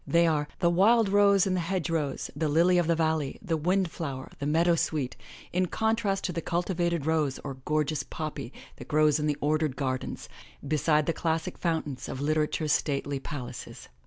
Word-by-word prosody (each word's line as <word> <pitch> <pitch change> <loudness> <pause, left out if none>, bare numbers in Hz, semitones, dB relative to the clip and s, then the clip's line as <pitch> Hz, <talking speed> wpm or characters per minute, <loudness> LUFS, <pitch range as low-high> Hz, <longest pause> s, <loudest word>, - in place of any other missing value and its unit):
They 170 0 +4
are 150 -3 +1
the 170 - +3
wild 210 +4 +4
rose 200 -1 +5
in 190 - 0
the 185 - +1
hedge 175 0 -1
rows, 160 -4 -2
the 155 -2 0
lily 175 +4 +4
of 170 - +1
the 170 - +3
valley, 160 -3 0
the 175 -6 -2
wind 180 +3 +1
flower, 135 -5 -5
the 140 - -2
meadowsweet, 155 -4 +1 0.4
in 180 +1 +2
contrast 220 -1 0
to 180 - -2
the 165 - -2
cultivated 170 -2 -1
rose 155 -4 +1
or 135 -2 -6
gorgeous 150 -1 0
poppy 150 -5 -6 0.3
that - - -10
grows 155 0 +3
in 150 - 0
the 145 -1 0
ordered 155 -2 +1
gardens, 130 -2 -3 0.4
beside 155 0 +2
the 165 - 0
classic 165 +2 -1
fountains 155 -6 -2
of 130 - -5
Literature's 155 +1 +1
stately 140 -1 -1
palaces." 125 -3 -7
160 Hz, 180 wpm, -28 LUFS, 150-175 Hz, 0.4 s, rose